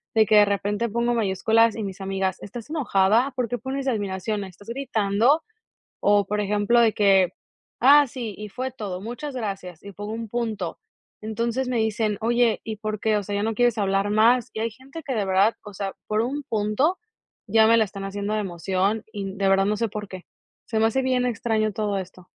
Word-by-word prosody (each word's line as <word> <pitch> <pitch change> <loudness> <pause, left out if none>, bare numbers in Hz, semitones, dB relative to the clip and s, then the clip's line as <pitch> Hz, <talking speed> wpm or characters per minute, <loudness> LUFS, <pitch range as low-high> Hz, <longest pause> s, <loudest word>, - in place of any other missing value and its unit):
de 220 -1 +5
que 215 - +3
de 210 - +8
repente 205 +3 -1
pongo 235 +2 0
mayúsculas, 225 +2 +2
y 220 - -4
mis 195 -1 -6
amigas: 190 -1 -1
"¿Estás 230 +4 -8
enojada? 240 -4 +2
¿Por 250 -3 -1
qué 245 - -1
pones 270 +1 -4
admiración? 205 -2 -2
¿Estás 195 +4 -13
gritando?". 235 +3 +1 0.6
O, 205 0 +4
por 210 0 -1
ejemplo, 205 +3 +2
de 225 -2 +4
que: 195 -3 +4 0.5
"Ah, 285 +3 +7
sí, 235 -4 -6
y 210 0 -7
fue 255 +5 -4
todo, 200 -7 -5
muchas 245 +6 -6
gracias", 195 -7 -5
y 200 - -9
pongo 205 +2 -6
un 225 0 -5
punto, 215 -6 -3 0.4
entonces 230 +4 -2
me 245 - 0
dicen: 220 -1 0
"Oye, 235 0 +2
¿y 220 -2 -5
por 215 -1 -4
qué?, 220 -1 +1
o 205 - -2
sea, 205 +1 -4
¿ya 205 - 0
no 225 +1 0
quieres 240 0 +2
hablar 195 0 +1
más?", 230 +3 +4
y 220 - -5
hay 230 0 -1
gente 275 +8 -11
que 265 - -2
de 215 - 0
verdad, 195 +4 +3
o 205 - -10
sea, 195 0 -4
por 215 0 +1
un 275 +5 -3
punto 230 - 0 0.5
ya 220 +1 +5
me 230 +1 +5
la 220 - +5
están 200 -1 -8
haciendo 200 +1 -3
de 215 - 0
emoción, 190 +3 -1
y 195 -2 -5
de 195 -1 +1
verdad 195 0 +4
no 210 +1 0
sé 230 - 0
por 210 0 -6
qué, 185 -1 -9 0.4
se 220 - -1
me 225 - +4
hace 265 +4 0
bien 255 -1 +1
extraño 220 -2 0
todo 205 -1 -1
esto. 185 -1 -10
215 Hz, 210 wpm, -24 LUFS, 200-235 Hz, 0.6 s, de